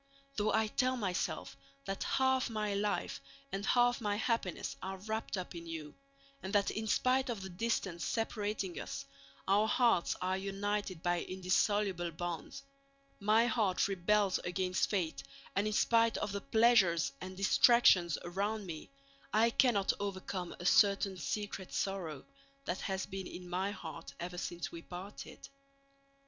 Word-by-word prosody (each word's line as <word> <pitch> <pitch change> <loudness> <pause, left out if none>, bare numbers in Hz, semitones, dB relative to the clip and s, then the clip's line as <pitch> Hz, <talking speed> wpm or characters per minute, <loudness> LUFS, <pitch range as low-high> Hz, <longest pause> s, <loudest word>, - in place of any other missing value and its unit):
Though 210 0 +1
I 220 +1 +3
tell 255 +4 +1
myself 190 -6 -2 0.3
that 195 0 -3
half 260 -1 +2
my 210 -2 -1
life 205 +1 -1 0.3
and 195 +1 -3
half 245 +2 +3
my 205 -2 0
happiness 205 - -1
are 190 +1 -4
wrapped 220 +2 -3
up 185 - -5
in 170 -1 -8
you, 155 -3 -6 0.5
and 190 - -5
that 205 -1 +3
in 220 0 -3
spite 255 +4 +2
of 220 -5 -3
the 190 - -7
distance 190 -3 -1
separating 210 -4 -2
us - - -5 0.4
our 205 +3 +4
hearts 230 -5 +3
are 185 +1 0
united 195 -2 -2
by 175 -1 +1
indissoluble 185 -1 +1
bonds, 175 - -5 0.6
my 215 +3 +4
heart 215 -6 +2
rebels 195 +1 +2
against 180 +1 0
fate 180 -6 -1 0.3
and 200 +2 +2
in 215 - -1
spite 230 +1 +3
of 210 - -2
the 200 0 -3
pleasures 205 -10 +4
and 185 0 -7
distractions 195 -4 +5
around 200 +4 -2
me 160 -4 -7 0.4
I 225 +3 +4
cannot 230 -6 +3
overcome 190 -2 -4
a 175 - -7
certain 200 0 +4
secret 190 +4 -4
sorrow 180 -8 -3 0.4
that 180 - -2
has 190 -1 -2
been 190 -1 -6
in 180 0 -8
my 185 +3 -1
heart 175 -6 -8
ever 175 +1 -5
since 175 -1 -4
we 170 - -8
parted. 185 +4 -9
195 Hz, 150 wpm, -34 LUFS, 180-215 Hz, 0.6 s, distractions